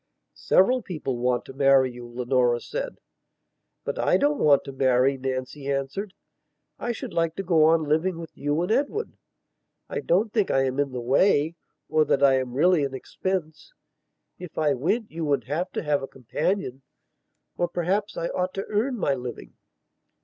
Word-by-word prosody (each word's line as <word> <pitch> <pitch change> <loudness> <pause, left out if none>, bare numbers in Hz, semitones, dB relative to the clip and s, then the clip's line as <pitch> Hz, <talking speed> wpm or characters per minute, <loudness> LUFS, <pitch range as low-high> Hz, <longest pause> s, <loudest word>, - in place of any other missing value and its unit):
"Several 250 +7 +3
people 155 - -4
want 125 0 0
to - - -10
marry 135 -1 +4
you," 120 0 -10
Leonora 120 0 +1
said. - - -5 0.9
"But - - -4
I - - +3
don't 290 0 +1
want 140 -2 +5
to - - -7
marry," 130 0 +3
Nancy 135 +2 -4
answered. 140 +9 -3 0.6
"I 240 - -2
should 230 - -6
like 165 -1 0
to 195 - -3
go 165 -4 +4
on 160 0 +4
living 160 +4 0
with 165 -1 -9
you 145 +2 -1
and 180 - -2
Edward. 285 - 0 0.8
I - - -2
don't 210 - +1
think 210 -4 +1
I 135 - +3
am 130 +1 -1
in 140 -1 +1
the 125 - -4
way 145 +5 +3 0.3
or 155 0 +3
that 140 - +1
I 135 -1 +5
am 125 -2 -4
really 170 +2 +4
an 135 -1 -3
expense. 160 +2 -4 0.7
If 180 -3 -10
I 150 -2 +2
went 205 - -1
you 165 0 -4
would 145 -2 +1
have 160 +7 -2
to - - -3
have 150 -2 +1
a 135 - -5
companion. 135 - -2 0.7
Or, 175 - 0
perhaps, 195 +5 -1
I 170 - -2
ought 185 0 -2
to 195 - -3
earn 235 +5 0
my 145 -9 +1
living...." 125 - -7
150 Hz, 180 wpm, -25 LUFS, 135-185 Hz, 0.9 s, want